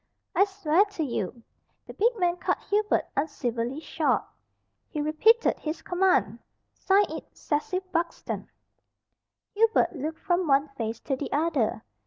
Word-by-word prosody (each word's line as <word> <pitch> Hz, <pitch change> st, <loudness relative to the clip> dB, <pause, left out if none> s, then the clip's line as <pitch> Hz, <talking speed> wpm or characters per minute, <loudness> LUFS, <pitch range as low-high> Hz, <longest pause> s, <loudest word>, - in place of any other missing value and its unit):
"I 395 Hz, -, +5 dB
swear 385 Hz, -3 st, +2 dB
to 400 Hz, -6 st, -4 dB
you 235 Hz, -4 st, -3 dB, 0.2 s
" -, -, -46 dB
The -, -, -10 dB
big 470 Hz, +3 st, +2 dB
man 355 Hz, -2 st, +1 dB
cut -, -, 0 dB
Hubert 420 Hz, +1 st, +2 dB
uncivilly 250 Hz, -3 st, -2 dB
short. -, -, 0 dB, 0.7 s
He 305 Hz, -, -4 dB
repeated 315 Hz, +11 st, +3 dB
his 315 Hz, +1 st, -4 dB
command. 355 Hz, -, +2 dB, 0.3 s
"Sign 395 Hz, +1 st, +3 dB
it -, -, -8 dB
'Cecil 365 Hz, +6 st, -1 dB
Buxton.'" 335 Hz, 0 st, -3 dB, 1.0 s
Hubert 445 Hz, -3 st, +3 dB
looked 310 Hz, +2 st, -4 dB
from 350 Hz, 0 st, 0 dB
one 280 Hz, +1 st, +3 dB
face 230 Hz, -4 st, -4 dB
to 270 Hz, -, -1 dB
the 275 Hz, +2 st, -5 dB
other. 285 Hz, -8 st, 0 dB
320 Hz, 140 wpm, -27 LUFS, 275-385 Hz, 1.0 s, I